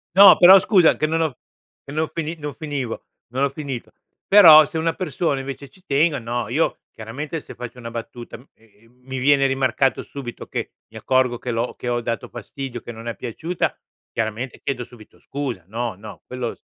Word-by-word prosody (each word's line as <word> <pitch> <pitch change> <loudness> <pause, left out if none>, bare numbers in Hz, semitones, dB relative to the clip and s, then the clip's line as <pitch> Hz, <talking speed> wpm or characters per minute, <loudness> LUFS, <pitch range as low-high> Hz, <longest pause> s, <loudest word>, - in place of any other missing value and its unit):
No, 195 0 +10
però, 190 +2 +9
scusa, 185 -4 +4
che 155 - +1
non 165 +1 0
ho 155 -6 -1 0.5
che - - -11
no 155 +1 0
fini 165 0 -3
non 150 -1 -6
finivo, 140 -6 -5 0.3
non 130 +2 -1
ho 140 - +2
finito. 140 -4 -6 0.4
Però 160 -7 +9
se 160 - -6
una 165 +1 0
persona, 170 -5 -2
invece, 135 +1 -7
ci 185 - -23
tengo, 145 +2 +2
no, 120 -1 -3
io 155 +7 0
chiaramente, 140 +9 -6
se - - -12
faccio 125 0 -8
una 115 -1 -7
battuta, 120 +1 -8 0.2
e, 110 0 -26
mhmm, 125 +1 -29
mi 130 0 -4
viene 140 +1 +4
rimarcato 135 0 +1
subito 130 -4 -8
che - - -4 0.2
mi - - -12
accorgo 130 -2 +1
che 125 - -5
l'ho 115 +1 -2
che 125 - -7
ho 120 0 0
dato 115 0 -3
fastidio, 120 +1 -7
che - - -8
non 115 0 -10
è 115 - -3
piaciuta, 160 +9 -3 0.3
chiaramente, 115 +3 -3
chiedo 130 -3 -3
subito 115 -3 -16
scusa. 135 -9 -5
No, 115 +1 -3
no, 105 +2 -11
quello 125 -2 -4
s - - -38
130 Hz, 195 wpm, -22 LUFS, 120-155 Hz, 0.5 s, No